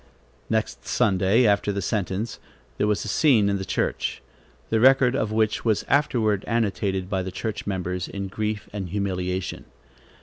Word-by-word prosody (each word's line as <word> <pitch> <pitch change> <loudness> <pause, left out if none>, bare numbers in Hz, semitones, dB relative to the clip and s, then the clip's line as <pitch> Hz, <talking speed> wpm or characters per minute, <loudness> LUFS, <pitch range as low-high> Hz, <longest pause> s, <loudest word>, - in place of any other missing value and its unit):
Next - - -2
Sunday 100 +4 +3
after 100 -1 +2
the 100 - -2
sentence, 105 +2 -2 0.4
there 105 - +2
was 105 0 0
a - - -5
scene 110 -3 +4
in 100 -1 0
the - - -3
church, - - -2 0.5
the 110 - +3
record 130 +1 +5
of 110 -5 -1
which 110 0 +1
was 110 -3 +1
afterward 115 -8 +2
annotated 100 -4 0
by 95 -1 -1
the 95 0 -5
church 110 +3 -4
members 90 -2 -2
in 100 -1 -5
grief 105 +2 -3
and 95 -4 -4
humiliation. 95 -1 -2
100 Hz, 160 wpm, -24 LUFS, 95-110 Hz, 0.5 s, record